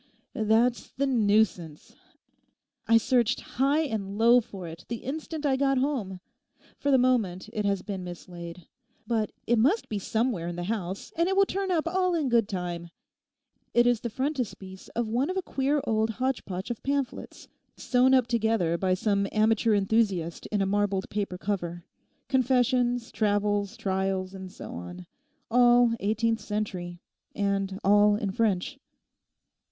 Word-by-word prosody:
'That's 225 +3 +1
the 280 - 0
nuisance. 210 - +1 0.9
I 230 - +6
searched 245 +1 +2 0.2
high 285 +3 +4
and 205 -9 -3
low 235 +2 +6
for 195 -5 -9
it 165 +1 -9
the 235 -1 -5
instant 310 +2 -5
I 270 -2 +3
got 275 0 +2
home. 250 -9 -1 0.6
For 285 - -1
the 270 - +6
moment 225 -7 +1
it 210 -2 -2
has 200 -2 0
been 195 -3 -5
mislaid; 175 -1 -9 0.4
but 225 -3 -1
it 235 -1 +2
must 310 - +2
be 210 - -2
somewhere 220 -4 -1
in 175 - -4
the 175 - -4
house 195 -1 -4
and 335 +2 +1
it 385 - +1
will 395 - +6
turn 390 0 -3
up 330 -3 +1
all 365 0 +1
in 300 -5 0
good 230 -3 +2
time. 175 -3 -4 0.9
It's 240 -1 +4
the 235 - -4
frontispiece 230 -7 -4
of 235 -1 0
one 245 +8 0
of 370 - -2
a 380 - -1
queer 280 0 0
old 220 -3 0
hotchpotch 215 -6 -3
of 235 - -5
pamphlets, 275 -2 -3 0.3
sewn 260 +1 +3
up 255 -2 +4
together 220 -8 +1
by 185 -1 +2
some 200 0 0
amateur 220 +1 +3
enthusiast 195 -5 0
in 205 -2 0
a - - 0
marbled 200 -1 0
paper 200 -3 -2
cover—confessions, 245 - -1
travels, 205 0 0
trials 190 -1 -1
and 190 -1 -8
so - - -9
on. 90 +1 -8 0.5
All 240 -1 +5
eighteenth 225 +2 0
century, 185 -5 -4 0.3
and 195 -1 -1
all 205 +1 +5
in 205 -2 -2
French. 215 +5 0
220 Hz, 150 wpm, -27 LUFS, 190-250 Hz, 0.9 s, I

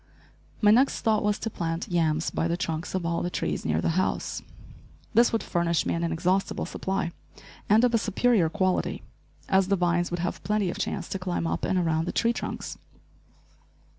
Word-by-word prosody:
My 210 -1 +6
next 255 +5 +3
thought 220 -2 +2
was 210 0 +1
to 225 - -4
plant 165 -2 -3
yams 160 -2 +1
by 165 - 0
the 170 +1 -1
trunks 165 -1 -3
of 185 -2 -1
all 170 0 0
the 175 - -1
trees - - -2
near 80 +1 0
the - - +1
house. - - -2 0.7
This 235 +2 +5
would 225 - 0
furnish 170 -1 0
me - - 0
an 170 - -1
inexhaustible 180 +3 0
supply, 190 -3 -2 0.6
and 215 +3 +5
of 245 -1 +3
a 230 - +4
superior 210 -4 +2
quality, 185 0 0 0.4
as 190 -1 +3
the 200 - +3
vines 175 -1 +1
would 175 -1 -3
have 175 - -3
plenty 210 -3 +1
of - - -7
chance - - -2
to 195 - -3
climb, 180 -2 -2
up - - -1
and 190 - +1
around 165 -2 +1
the - - -2
tree 235 0 +2
trunks. - - -5
180 Hz, 195 wpm, -27 LUFS, 170-210 Hz, 0.7 s, My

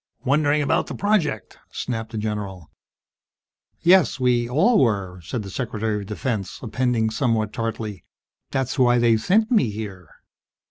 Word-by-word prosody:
"Wondering 145 +2 +2
about - - +1
the - - -6
project!" 165 - 0
snapped 115 -3 -4
the 110 - -5
general. 105 -6 -4 1.1
"Yes. 175 -5 +4
We 120 -2 +2
all 195 - +4
were," 95 -6 -1
said 110 +6 -4
the 100 - -8
Secretary 110 -2 -2
of 100 - -8
Defense, 105 -2 -3
appending 120 -2 0
somewhat 110 -3 0
tartly, 110 -3 -4 0.5
"That's 135 +1 -2
why 120 -1 +5
they 120 -1 +4
sent 215 - +2
me 210 - +3
here." 100 -5 -7
115 Hz, 140 wpm, -23 LUFS, 105-135 Hz, 1.1 s, why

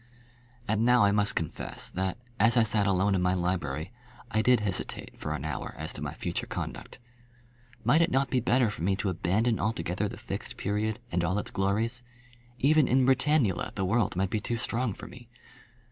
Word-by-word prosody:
And 110 +1 +1
now 125 -1 +5
I 100 - +5
must 105 0 +2
confess 80 - -4
that, 95 +2 -2 0.2
as 115 +4 +4
I 115 - +6
sat 105 -2 +1
alone 100 +1 +2
in 95 - +1
my 90 +1 +2
library, 85 -3 -2 0.4
I 110 - +2
did 125 -1 +4
hesitate 100 -3 -2
for - - -3
an 70 - -5
hour 75 -4 -4
as - - -5
to - - -7
my - - -4
future - - -3
conduct. - - -6 0.9
Might 140 +9 +4
it 170 - +3
not 135 -3 +1
be 130 - +3
better 120 -1 +2
for 105 - -8
me 95 +3 +2
to 100 0 -1
abandon 100 +6 +1
altogether 100 -1 -1
the - - -8
Fixed - - -5
Period 105 +2 -1
and 85 0 0
all 90 +4 0
its 105 - -2
glories? 110 +5 0 0.6
Even 150 +2 +4
in 130 +1 +3
Britannula 130 - +2
the 95 - -1
world 105 0 +1
might 95 +1 0
be 110 - +1
too 120 +3 -2
strong 115 -2 -2
for - - -9
me. 120 -1 -12
105 Hz, 195 wpm, -28 LUFS, 95-120 Hz, 0.9 s, I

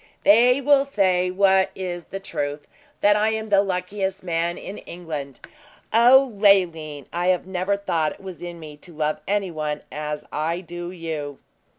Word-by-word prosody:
"They 245 +6 +5
will 280 0 +5
say 185 -9 +1
what 190 0 +3
is 175 -2 -5
the 195 - -6
truth 145 -5 -4 0.4
that 205 0 +5
I 210 +1 +2
am 220 0 -4
the 200 -1 +5
luckiest 190 0 -3
man 170 -1 -1
in 200 - -8
England. 155 -6 -7 0.5
O 250 +2 +6
Leoline! 170 - +2
I 180 +1 +2
never 190 +2 -1
thought 165 -6 -1
it - - -18
was 190 -3 -9
in 175 -1 -7
me 150 -2 -10
to 170 +2 -14
love 155 0 -1
any 200 -2 0
one 150 -2 -3
as 150 0 -4
I 165 +4 -2
do 175 0 -7
you."' 160 -5 -5
180 Hz, 165 wpm, -23 LUFS, 160-200 Hz, 0.5 s, O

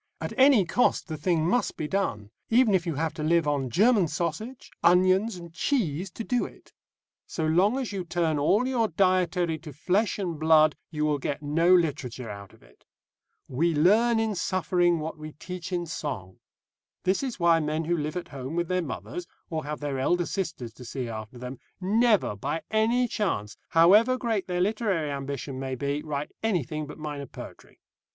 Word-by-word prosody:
At - - -4
any 260 -7 +6
cost 245 +5 +1
the 160 - -3
thing 160 0 +1
must 245 +7 0
be 150 - -3
done, 110 - -2 0.2
even 230 -2 +4
if 180 -2 +1
you 165 - -1
have 160 +2 -1
to 160 - -7
live 165 0 +2
on 140 -3 0
German 205 - +4
sausage, 170 - -4
onions, 185 +5 +4
and 170 -2 -10
cheese 185 - -1
to 230 - -5
do 245 +2 0
it. - - -11 0.5
So 160 - -3
long 185 +10 +3
as 260 -5 -3
you 195 -2 -3
turn 165 -3 0
all 205 - +3
your 240 -4 +1
dietary 180 -2 +1
to 155 -1 -9
flesh 185 - 0
and 175 -6 -3
blood 155 -1 +5
you 150 -2 -1
will 150 -1 +1
get 140 +2 -3
no 165 +5 +2
literature 140 -9 +1
out 100 -1 -9
of - - -21
it. - - -23 0.6
"We 160 +6 0
learn 220 +9 +4
in 220 -1 0
suffering 180 -2 +1
what 155 0 -5
we 155 0 -8
teach 180 +3 -7
in 175 -1 -1
song." 125 - -5 0.6
This 185 +1 +1
is 260 -6 -4
why 170 -1 +4
men 155 +1 -1
who 175 +2 +1
live 155 +1 -3
at 180 - -6
home 135 +2 -6
with 170 -1 -1
their 185 0 +1
mothers, 145 - -6 0.2
or 155 -2 -3
have 150 0 -5
their 140 -2 -2
elder 175 +6 +1
sisters 160 - -4
to 125 - -12
see 125 0 -5
after 110 +2 -7
them, 125 +1 -7 0.2
never, 210 - +2
by 145 +10 -3
any 230 +3 +2
chance, 115 - -2
however 210 +10 +5
great 225 -6 -1
their 180 -1 -1
literary 195 -7 0
ambition 140 -1 -5
may 130 -1 -3
be, 140 +3 -2
write 150 -1 -4
anything 155 - -1
but 150 - -9
minor 145 -3 -5
poetry. - - -11
165 Hz, 190 wpm, -27 LUFS, 145-195 Hz, 0.6 s, any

